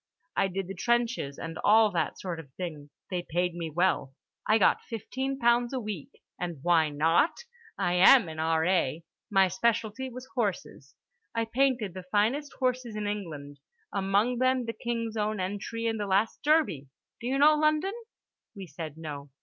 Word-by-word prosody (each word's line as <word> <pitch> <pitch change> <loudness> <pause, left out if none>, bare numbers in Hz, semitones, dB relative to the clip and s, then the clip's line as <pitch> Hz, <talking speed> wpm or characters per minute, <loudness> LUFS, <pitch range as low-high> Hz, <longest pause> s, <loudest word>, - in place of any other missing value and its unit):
I - - +2
did 190 0 -4
the 195 - -5
trenches 235 - 0
and 165 -1 -6
all 215 0 +5
that 165 -4 -1
sort 175 -3 -4
of 145 -5 -11
thing. 155 -5 -6 0.2
They 180 -1 -1
paid 175 +2 0
me 170 -1 -4
well; 155 -5 0 0.3
I 215 - +5
got 200 - +3
fifteen 265 +4 -4
pounds 240 0 +2
a 260 - -1
week. 210 - -5 0.3
And 175 -2 -3
why 165 -3 +4
not? 160 - +2 0.4
I 175 - 0
am 190 +4 +7
an 160 -1 -7
R.A. 160 -1 +1 0.3
My 195 -3 +4
specialty 225 +6 -1
was 255 +1 -9
horses. 200 - -3 0.4
I 230 0 +1
painted 240 -4 +1
the 185 - -6
finest 220 +10 0
horses 250 -3 -1
in 210 -1 -3
England, 155 -9 -5 0.3
among 200 +5 +1
them 255 -1 +2
the 230 - -3
King's 230 -2 -3
own 215 0 -1
entry 205 +5 -3
in 225 -1 0
the 205 -1 -3
last 200 +3 +1
Derby. 295 - +2 0.3
Do 235 - -5
you 265 +2 +1
know 295 +2 +7
London?" 305 +5 +2 0.6
We 195 -2 -7
said 160 -3 -8
no. 145 -3 -7
205 Hz, 170 wpm, -28 LUFS, 170-240 Hz, 0.6 s, am